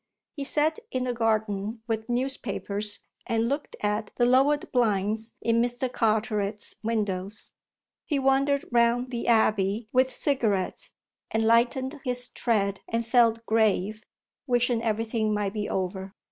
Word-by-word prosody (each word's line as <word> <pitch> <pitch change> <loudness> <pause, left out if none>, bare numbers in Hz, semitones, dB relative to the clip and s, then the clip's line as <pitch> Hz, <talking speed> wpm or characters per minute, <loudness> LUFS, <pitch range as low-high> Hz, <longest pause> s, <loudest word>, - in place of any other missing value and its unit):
He 285 - -4
sat 305 +7 +1
in 255 -1 -2
the 250 -1 -1
garden 220 -1 -1
with 225 0 -3
newspapers 215 -5 -1 0.3
and 230 0 +1
looked 285 +3 -3
at 210 0 -1
the 240 - +3
lowered 270 +4 +3
blinds 220 -1 0
in 230 0 +3
Mr. 245 +1 -1
Carteret's 215 -2 0
windows; 210 -2 -2 0.5
he 295 - +1
wandered 275 +1 +2
round 240 +1 +2
the 235 -1 -3
abbey 215 -2 +2
with 255 +1 +3
cigarettes 220 -10 -1 0.4
and 220 0 0
lightened 250 +4 +2
his 250 -1 -1
tread 200 -4 0
and 230 0 -1
felt 230 -1 +3
grave, 215 -1 +1 0.4
wishing 245 -2 +2
everything 220 -1 0
might 205 -1 -1
be 210 -1 -3
over. 190 +1 -3
230 Hz, 130 wpm, -27 LUFS, 210-245 Hz, 0.5 s, the